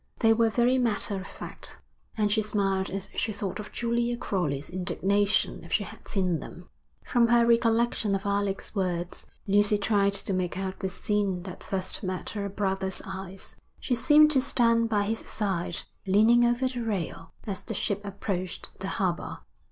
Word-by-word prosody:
They 225 -2 +5
were 225 0 +3
very 245 +3 +3
matter 215 -4 +1
of 185 - -9
fact, - - -6 0.4
and 210 -1 +2
she 215 +1 +3
smiled 195 -2 0
as 195 +1 -4
she 220 - -1
thought 200 -2 -4
of 210 - -7
Julia 235 0 0
Crowley's 150 - -2
indignation 195 +3 +1
if - - -12
she - - +2
had - - -12
seen 180 -5 0
them. 175 +4 -10 0.4
From 235 -1 +3
her 235 0 +5
recollection 230 -3 +2
of 195 - -4
Alec's 200 -1 -1
words, 180 -3 -2 0.2
Lucy 205 +1 +4
tried 200 -1 +2
to 200 - 0
make 180 -1 -1
out 190 0 -4
the 190 - -2
scene 195 -2 -1
that 185 -1 -8
first 190 -2 -2
met 185 -3 -4
her 200 -2 -3
brother's 190 -1 -1
eyes. 190 -1 -7 0.2
She 255 - -1
seemed 300 +5 +6
to 270 -3 +4
stand 230 -3 +3
by 205 -2 +2
his 220 +2 -1
side, 185 -5 -2 0.2
leaning 225 +5 +5
over 240 +2 +2
the 250 -1 -4
rail, 190 -7 -3
as 200 -2 -3
the - - -5
ship 205 0 -1
approached 195 -2 -4
the 190 - -4
harbour. 185 -4 -2
200 Hz, 175 wpm, -27 LUFS, 190-230 Hz, 0.4 s, seemed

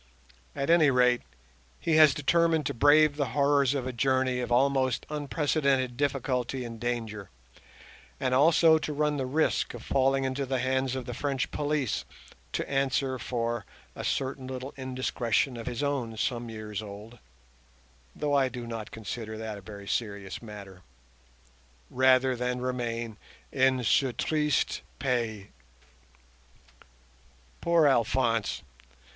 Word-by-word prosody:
At 140 +4 0
any 165 -4 +6
rate, 125 -1 +3 0.6
he 160 -2 +1
has 155 -3 +7
determined 165 +1 +2
to - - -1
brave 145 +4 +5
the 140 -2 0
horrors 140 -1 +3
of 130 -3 -2
a 130 - -3
journey 130 0 +1
of 120 -1 -4
almost 130 0 +2
unprecedented 140 -3 0
difficulty 130 -2 -1
and 115 -1 -8
danger, 110 -5 -3 0.9
and 130 -1 0
also 160 +3 +5
to 155 - -4
run 150 0 0
the 130 -2 -2
risk 155 +5 0
of - - -9
falling 135 0 +2
into 130 +1 -2
the 130 0 0
hands 130 0 0
of 130 -2 -4
the 125 - -5
French 135 +1 -2
police 145 -5 -1 0.5
to - - -2
answer 135 -1 0
for 120 -2 -2 0.3
a - - -6
certain 130 -1 -2
little 130 +1 -6
indiscretion 130 -1 -1
of 115 0 -7
his 125 +2 -3
own 130 -6 -2
some 120 +1 -2
years 110 -2 -5
old 105 +3 -10 1.0
(though 145 -1 -1
I 135 -2 +3
do 125 -1 -7
not 115 -3 -6
consider 110 0 -6
that 110 -2 -5
a - - -14
very 100 0 -10
serious 100 -4 -3
matter), 100 -5 -10 1.1
rather 130 0 +4
than 125 +1 -2
remain 120 -3 -3 0.3
in 130 -1 +2
ce 125 +4 +3
triste 150 -3 0 0.2
pays. 115 -6 -2 2.1
Poor 170 -2 +4
Alphonse! 115 -3 +1
130 Hz, 135 wpm, -28 LUFS, 115-140 Hz, 2.1 s, has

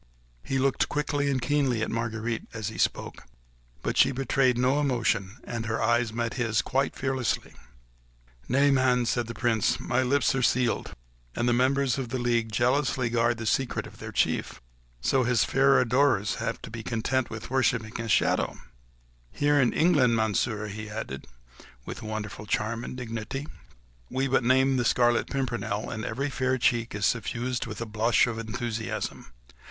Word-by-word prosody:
He 135 - -1
looked 135 +1 +1
quickly 145 -1 0
and 135 -2 +1
keenly 130 -3 +1
at - - -2
Marguerite 115 0 -3
as 110 -1 -3
he 110 - -9
spoke; - - -1 0.6
but - - -2
she - - +6
betrayed 130 -1 +1
no 130 +4 +2
emotion, 120 -7 0
and 115 -1 -4
her 115 0 -1
eyes 120 0 +2
met 115 +1 -2
his 115 -3 0
quite 135 +1 0
fearlessly. 130 -2 -2 1.0
"Nay, 140 +3 +4
man," 130 -2 +3
replied 120 0 0
the 115 - -6
Prince, 115 -4 +1
"my 125 0 0
lips 140 +3 +2
are 135 - 0
sealed! 125 -1 +1 0.4
and 120 - 0
the 120 - +3
members 135 +2 +2
of 125 -3 -4
the 130 - -2
league 120 -2 0
jealously 125 +2 +1
guard 120 0 +2
the 110 - -5
secret 130 +3 0
of - - -13
their - - -7
chief... - - 0 0.4
so 130 - +2
his 125 -1 +3
fair 135 0 +4
adorers 125 -4 +2
have 115 - -3
to - - -8
be 115 0 -6
content 120 +3 -1
with 115 +2 -7
worshipping 115 -4 0
a 115 - -5
shadow. - - +2 0.7
Here 145 - +2
in 125 - +3
England, 145 -8 +3
Monsieur," 110 0 0
he 105 +1 -6
added, 105 -12 -6 0.6
with - - -7
wonderful 110 -1 -5
charm 115 +3 -1
and 125 - -6
dignity, 120 +3 -5 0.6
"we 135 +1 0
but 135 -1 +2
name 130 +2 +3
the 125 - +1
Scarlet 120 0 +3
Pimpernel, 120 -6 -2
and 110 -1 -4
every 140 +5 -2
fair 130 0 0
cheek 120 -1 +1
is 105 -1 0
suffused 120 +2 -1
with 110 -2 -6
a - - -2
blush 110 +2 +2
of 115 -2 -4
enthusiasm. 115 - -4
120 Hz, 170 wpm, -27 LUFS, 110-130 Hz, 1.0 s, she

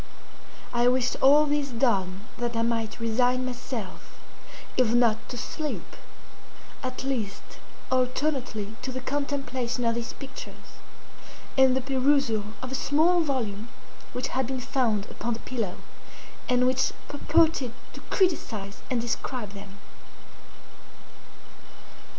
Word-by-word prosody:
I 240 0 +4
wished 255 0 +3
all 290 +3 +7
this 295 -1 +1
done 200 -7 +1 0.2
that 240 -1 -1
I 230 - +2
might 230 -1 -1
resign 245 +3 +2
myself, 245 -5 -6 0.6
if 240 -2 +3
not 230 -2 +3
to 245 - -5
sleep, 300 +5 -4 0.9
at 255 -1 -4
least 230 -7 -3 0.3
alternately 255 -4 0
to 260 +1 -3
the 260 - -3
contemplation 260 -3 -2
of 230 - +3
these 235 0 -3
pictures, 270 -1 -10 0.8
and 265 -1 +6
the - - +1
perusal 265 -4 +2 0.2
of 255 - -5
a - - -3
small 320 +6 +3
volume 235 -8 -1 0.4
which 250 0 -2
had 260 -1 0
been 265 0 -2
found 235 -5 +1
upon 240 -1 -2
the - - -8
pillow, 225 -8 -3 0.7
and 250 0 +4
which 255 0 +3 0.2
purported 295 -3 +3 0.2
to - - -8
criticise 220 - 0
and 250 - +1
describe 235 -2 -3
them. 200 -1 -10
250 Hz, 120 wpm, -27 LUFS, 230-270 Hz, 0.9 s, all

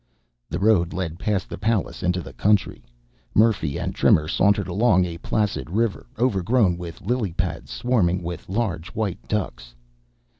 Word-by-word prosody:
The 85 - -2
road 95 -4 +3
led 85 -2 -4
past 100 0 -1
the - - -7
palace 110 0 -1
into 90 -1 0
the 65 - -10
country. 100 +11 +1 0.5
Murphy 105 -10 +3
and - - -3
Trimmer 75 -1 +3
sauntered 100 +4 +2
along 95 -1 +3
a 85 -1 -6
placid 105 -4 -1
river, 110 +3 -1
overgrown 110 -3 +2
with 85 -2 -8
lily 120 -8 -1
pads, 90 0 -3
swarming 95 -8 +1
with 85 0 -6
large 95 -5 -1
white 105 -5 -2
ducks. - - -3
95 Hz, 150 wpm, -23 LUFS, 85-110 Hz, 0.5 s, road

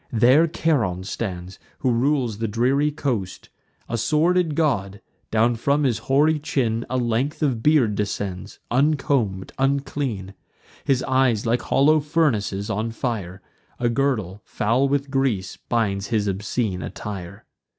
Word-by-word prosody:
There 125 +8 +5
Charon 125 - 0
stands, 95 -3 -5 0.2
who 130 - 0
rules 120 -3 +1
the 115 - -1
dreary 130 +7 +2
coast: 120 -11 -3 0.4
A 115 - -2
sordid 160 +6 +2
god: 105 -11 0 0.3
down 115 +2 +2
from 140 +5 +1
his 120 -5 +1
hoary 150 +3 +4
chin 120 -6 -1
A 130 - -1
length 125 +6 -1
of 130 -6 0
beard 140 -6 +3
descends, 100 -2 -4
uncomb'd, 130 -8 +1
unclean; 135 -7 -1 0.5
His 135 -3 +2
eyes, 130 -5 +2
like 120 +2 +1
hollow 155 +3 +3
furnaces 130 - 0
on 110 +1 -2
fire; 105 -6 -4 0.4
A 120 -1 +1
girdle, 115 -7 -1
foul 125 +6 +1
with 140 0 -1
grease, 125 -9 0
binds 100 -4 0
his 110 -3 0
obscene 100 0 -2
attire. 100 0 -7
120 Hz, 130 wpm, -23 LUFS, 105-140 Hz, 0.5 s, There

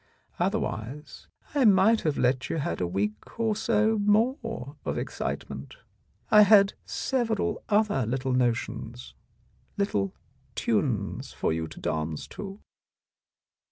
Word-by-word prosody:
Otherwise 125 +8 -3 0.3
I 285 -2 +3
might 210 +1 +5
have 155 -3 0
let 125 +1 +1
you - - -1
have 95 - -2
a 90 - +1
week 105 - -3
or 220 -2 +1
so 220 0 +2
more 215 - 0
of - - -2
excitement. - - -5 0.6
I 210 -1 +9
had 200 -1 +6
several 240 -5 -1
other 205 - +2
little 130 +2 -1
notions, 115 - -2 0.6
little 100 - 0 0.4
tunes - - -1
for - - 0
you 80 0 -2
to - - -11
dance 80 0 -2
to." 195 0 -7
185 Hz, 120 wpm, -27 LUFS, -, 0.6 s, I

